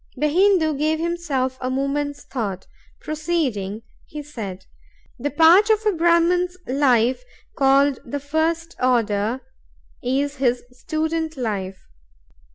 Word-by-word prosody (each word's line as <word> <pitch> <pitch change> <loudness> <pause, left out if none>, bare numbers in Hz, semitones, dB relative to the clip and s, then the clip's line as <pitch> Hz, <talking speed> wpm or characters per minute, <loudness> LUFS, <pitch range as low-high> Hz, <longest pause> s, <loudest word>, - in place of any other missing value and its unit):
The 300 +3 0
Hindoo 355 -2 +3
gave 310 +1 +1
himself 315 -6 -2
a 255 - -2
moment's 285 +2 -2
thought; 200 -7 -4 0.4
proceeding, 275 - -2 0.2
he 300 0 -7
said: 200 -10 -7 0.5
"The 285 +4 -1
part 335 +8 +6
of 435 0 +2
a 425 - +4
Brahman's 345 +1 +2
life 255 - +2 0.3
called 275 0 +3
the 285 +4 -4
first 320 +3 -1
order 230 -1 +1 0.6
is 280 +3 -1
his 245 -2 +1
student 315 +4 -3
life. 195 -6 -4
285 Hz, 115 wpm, -22 LUFS, 250-325 Hz, 0.6 s, part